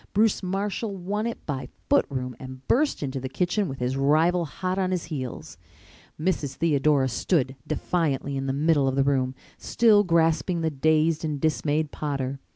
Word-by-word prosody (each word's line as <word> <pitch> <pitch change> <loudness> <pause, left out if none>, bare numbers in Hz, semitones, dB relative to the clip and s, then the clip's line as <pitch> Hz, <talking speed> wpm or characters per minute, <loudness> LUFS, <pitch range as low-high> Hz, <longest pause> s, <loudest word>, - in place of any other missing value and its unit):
Bruce 215 +1 +3
Marshall 195 +2 -2
won 205 +5 -2
it 235 - -6
by 140 -3 -4 0.2
foot 285 - +3
room 125 -3 -4
and 130 0 -10
burst 290 - +2
into 135 -1 -3
the 130 0 -5
kitchen 180 +7 0
with 135 - -5
his 125 +1 -1
rival 160 +6 +3
hot 185 +5 -3
on 185 -1 +1
his 180 -2 -1
heels. 130 -4 -6 0.6
Mrs. 155 -5 -1
Theodora 145 -3 +2
stood 130 +1 0
defiantly 140 -5 -1
in 135 0 -3
the - - +1
middle 145 0 +2
of 135 - 0
the 135 - +3
room, 130 -2 +1 0.2
still 215 -3 +4
grasping 165 -1 +2
the 160 -1 0
dazed 155 +2 +2
and 150 -2 -2
dismayed 155 0 0
Potter. 140 -2 -3
155 Hz, 170 wpm, -25 LUFS, 135-180 Hz, 0.6 s, still